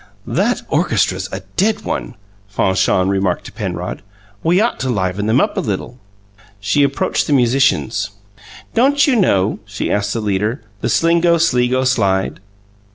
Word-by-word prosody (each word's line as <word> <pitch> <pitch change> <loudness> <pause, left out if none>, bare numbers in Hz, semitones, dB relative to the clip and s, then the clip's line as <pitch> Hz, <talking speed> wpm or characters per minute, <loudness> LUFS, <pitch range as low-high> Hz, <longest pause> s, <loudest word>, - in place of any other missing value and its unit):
"That - - 0
orchestra's 95 +1 0
a 95 - -5 0.2
dead 215 +2 +2
one," - - -4 0.3
Fanchon 95 -2 +1
remarked 95 -2 0
to - - -9
Penrod. - - -5 0.4
"We 175 +3 +2
ought 230 +3 0
to 130 - -2
liven 100 -2 -1
them 115 +4 +3
up - - 0
a - - +2
little!" 115 +4 -4 0.6
She 100 +8 +1
approached 140 0 0
the 150 - +1
musicians. 120 - +2 0.6
"Don't 280 +5 +4
you 275 - +2
know," 105 - +2
she 100 -1 -4
asked 105 0 0
the 115 - -2
leader, 105 +3 -1 0.2
"the - - -2
Slingo 170 0 +3
Sligo 130 -4 +2
Slide?" 95 -7 +1
115 Hz, 150 wpm, -17 LUFS, 100-165 Hz, 0.6 s, Don't